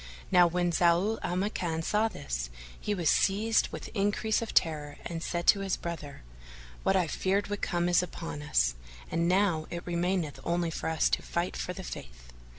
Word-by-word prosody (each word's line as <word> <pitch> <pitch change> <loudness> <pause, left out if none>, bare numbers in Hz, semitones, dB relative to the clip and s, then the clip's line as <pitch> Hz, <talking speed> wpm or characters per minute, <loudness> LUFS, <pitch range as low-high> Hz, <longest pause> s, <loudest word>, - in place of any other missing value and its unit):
Now 180 -2 +7
when 175 +1 0
Zau 175 +6 +3
al 175 - -2
Makan 175 -4 -1
saw 215 +6 +2
this, - - -4 0.3
he 210 - -1
was 175 -4 -1
seized 210 +7 +3
with - - -7
increase 205 +1 +1
of 230 - -4
terror 150 -3 +1
and 165 -1 -4
said 170 0 -2
to 200 - +6
his 195 -1 -1
brother, 155 - -6 0.6
"What 195 - +2
I 185 -2 +3
feared 195 +6 0
would 205 0 -3
come, 175 -1 0
is 175 -1 +4
come 180 - -1
upon 165 -3 -6
us, 65 - +2 0.4
and 170 0 +1
now 180 -4 +2
it 170 0 -6
remaineth 175 -2 -1
only 170 -1 0
for 160 - -3
us 160 -1 +2
to - - +1
fight 170 +1 -2
for 180 - -3
the 190 - -7
Faith." - - -9
175 Hz, 190 wpm, -30 LUFS, 160-195 Hz, 0.6 s, Now